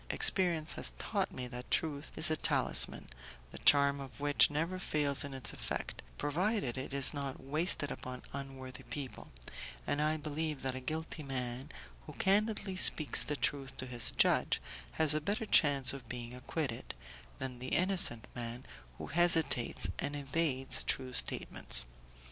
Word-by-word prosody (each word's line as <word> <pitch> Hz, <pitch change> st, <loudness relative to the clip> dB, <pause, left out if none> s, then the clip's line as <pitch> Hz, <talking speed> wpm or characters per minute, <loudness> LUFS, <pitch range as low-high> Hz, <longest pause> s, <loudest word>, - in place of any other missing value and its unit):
Experience 170 Hz, -5 st, +2 dB
has -, -, -3 dB
taught -, -, -2 dB
me 125 Hz, -, -5 dB
that 125 Hz, 0 st, -8 dB
truth 150 Hz, -2 st, -1 dB
is 155 Hz, -, +1 dB
a -, -, +2 dB
talisman, 65 Hz, -, +5 dB, 0.5 s
the -, -, -10 dB
charm 140 Hz, 0 st, +6 dB
of 135 Hz, 0 st, -9 dB
which 145 Hz, 0 st, +4 dB
never 165 Hz, +5 st, -2 dB
fails 145 Hz, -5 st, 0 dB
in 140 Hz, -, -7 dB
its 135 Hz, -1 st, -2 dB
effect, -, -, -5 dB, 0.2 s
provided 175 Hz, -, -1 dB
it 130 Hz, +1 st, -6 dB
is 140 Hz, +1 st, +4 dB
not 140 Hz, -2 st, -5 dB
wasted 150 Hz, +1 st, 0 dB
upon 125 Hz, 0 st, -7 dB
unworthy 135 Hz, -2 st, -7 dB
people, 140 Hz, -3 st, -7 dB, 0.6 s
and 145 Hz, -, -1 dB
I 155 Hz, +1 st, +1 dB
believe 155 Hz, -1 st, -4 dB
that 130 Hz, -1 st, -1 dB
a 130 Hz, -, -5 dB
guilty 160 Hz, +4 st, -5 dB
man, 130 Hz, -2 st, -4 dB, 0.4 s
who -, -, -9 dB
candidly 205 Hz, 0 st, 0 dB
speaks 155 Hz, -5 st, +6 dB
the 150 Hz, -, -1 dB
truth 135 Hz, -2 st, -2 dB
to -, -, -5 dB
his 120 Hz, -2 st, -2 dB
judge, -, -, +3 dB, 0.3 s
has 155 Hz, -2 st, +3 dB
a 155 Hz, -, -1 dB
better 205 Hz, +8 st, -2 dB
chance 140 Hz, -9 st, +4 dB
of 135 Hz, -2 st, -10 dB
being 120 Hz, -1 st, -6 dB
acquitted, 125 Hz, 0 st, -5 dB, 0.4 s
than 130 Hz, -2 st, -6 dB
the 130 Hz, -, -6 dB
innocent 180 Hz, -, +1 dB
man 120 Hz, +1 st, -6 dB, 0.3 s
who -, -, -7 dB
hesitates 160 Hz, -, +2 dB
and 145 Hz, +1 st, -2 dB
evades 140 Hz, -2 st, -1 dB
true 130 Hz, -1 st, 0 dB
statements. 65 Hz, -, -1 dB
140 Hz, 155 wpm, -33 LUFS, 130-155 Hz, 0.6 s, charm